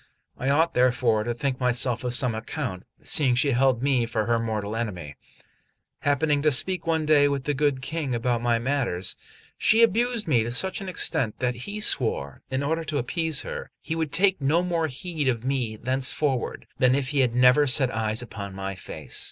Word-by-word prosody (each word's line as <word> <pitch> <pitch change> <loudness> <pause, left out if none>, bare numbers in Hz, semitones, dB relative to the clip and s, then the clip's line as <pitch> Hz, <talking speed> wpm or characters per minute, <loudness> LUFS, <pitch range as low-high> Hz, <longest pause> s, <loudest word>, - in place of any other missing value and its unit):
I 135 - -2
ought 160 +4 +2
therefore 125 -3 +2
to 120 0 -2
think 130 +1 -2
myself 125 -1 +1
of 125 0 -1
some 125 -2 +1
account, 110 - -5 0.2
seeing 140 -9 +2
she 140 +3 +2
held 130 -1 +2
me 130 -4 +2
for 110 -2 -1
her 115 0 +1
mortal 110 -2 -3
enemy. 90 -11 -5 0.8
Happening 145 0 +1
to 150 +1 +3
speak 170 +6 +1
one 160 -1 +1
day 150 -2 +5
with 140 -2 -2
the 145 - -1
good 140 -1 0
King 140 -3 -3
about 120 0 -1
my 120 -1 +2
matters, 120 -8 -1 0.4
she 225 +2 +5
abused 230 -1 +1
me 125 -7 +3
to 115 +2 -3
such 190 +12 +1
an 195 - -5
extent 150 - -1
that 125 -1 -1
he 200 - -7
swore, 110 - -1
in 130 +1 -2
order 160 +3 -1
to 155 -2 -3
appease 160 +3 -1
her, - - -7
he 160 - -4
would 160 -3 -2
take 190 0 +3
no 155 +6 +2
more 170 -3 0
heed 155 +1 -4
of 120 -2 -1
me 130 -5 -1
thenceforward 130 +2 -1
than 125 0 +4
if 135 -2 -1
he 145 - 0
had 125 -3 +2
never 125 +4 +5
set 130 0 +4
eyes 110 +1 -1
upon 100 -5 -8
my 95 0 -4
face. 90 - -5
130 Hz, 195 wpm, -25 LUFS, 120-150 Hz, 0.8 s, day